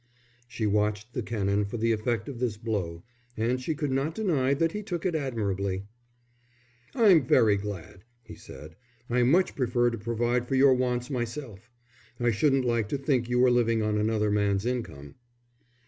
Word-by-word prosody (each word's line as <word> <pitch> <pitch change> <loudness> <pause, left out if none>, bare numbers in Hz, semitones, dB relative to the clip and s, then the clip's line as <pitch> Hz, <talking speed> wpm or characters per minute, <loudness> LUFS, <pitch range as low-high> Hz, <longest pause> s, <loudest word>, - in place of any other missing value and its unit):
She 115 -2 -4
watched 105 +2 0
the 125 - -2
Canon 105 -2 -1
for 100 +4 -5
the 115 +1 +1
effect 110 0 -1
of 130 -4 -7
this 120 -4 -1
blow, 100 -7 -3 0.3
and 120 +3 0
she 155 +5 -2
could 150 -2 -2
not 140 +5 -1
deny 145 -11 +1
that 165 +3 +1
he 210 - -4
took 180 -4 -5
it 180 - +1
admirably. 100 -9 -2 1.1
"I'm 200 - +6
very 110 -4 +4
glad," 100 -3 -7 0.2
he - - -11
said. 80 +1 -12 0.4
"I 125 +1 +2
much 165 +10 +3
prefer 120 -2 +1
to 115 - -5
provide 120 +2 -1
for 135 - -1
your 135 0 +6
wants 125 +1 -1
myself. 120 -3 -5 0.5
I 120 -1 +2
shouldn't 135 +3 +2
like 115 -3 0
to 145 - -1
think 130 -3 0
you 125 - +1
were 125 0 +5
living 115 -2 +2
on 105 0 0
another 105 -1 +1
man's 100 0 +1
income." 80 - -5
120 Hz, 175 wpm, -27 LUFS, 105-130 Hz, 1.1 s, I'm